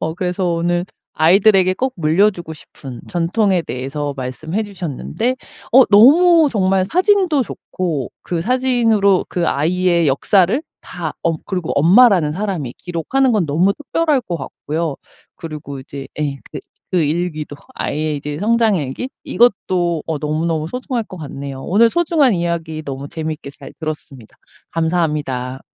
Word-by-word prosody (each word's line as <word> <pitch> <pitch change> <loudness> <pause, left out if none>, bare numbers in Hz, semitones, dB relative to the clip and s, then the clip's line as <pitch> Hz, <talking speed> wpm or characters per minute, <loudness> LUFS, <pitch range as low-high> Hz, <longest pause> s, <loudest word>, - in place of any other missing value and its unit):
어 160 0 -2
그래서 180 +1 -2
오늘 175 +1 0 0.3
아이들에게 185 +3 +5
꼭 260 +5 -1
물려 170 +6 +3
주고 175 -5 -9
싶은 135 -4 -11
전통에 180 +2 +1
대해서 140 +3 -4
말씀해 155 +10 -3
주셨는데 205 - -3 0.4
어 260 0 +8
너무 310 - +6
정말 190 -4 +2
사진도 365 - +2
좋고 170 - -4
그 170 -2 -3
사진으로 225 -3 +2
그 175 -1 -1
아이의 170 +3 +1
역사를 190 - +2 0.2
다 - - -6
어 165 -1 +1
그리고 180 -4 -3
엄마라는 180 - +5
사람이 175 - -3
기록하는 240 +10 0
건 210 -5 +2
너무 170 +7 +2
특별할 295 +1 0
것 175 -4 -4
같고요. 150 +2 -4 0.4
그리고 150 -4 -7
이제 135 +1 -8
예 140 -2 -1
그 - - -6 0.3
그 180 -3 +2
일기도 155 -1 -2 0.2
아이의 155 0 -2
이제 145 +1 -5
성장일기, 215 - 0
이것도 180 -8 +1
어 160 - -2
너무너무 155 +1 -2
소중할 250 +2 -3
것 185 - -11
같네요. 140 -3 -7
오늘 225 +9 +3
소중한 320 -5 +2
이야기 170 -3 -2
너무 140 -1 -6
재미있게 155 -3 -5
잘 140 - -13
들었습니다. 150 -7 -7 0.3
감사합니다. 150 -6 -1
175 Hz, 325 characters per minute, -18 LUFS, 150-210 Hz, 0.4 s, 어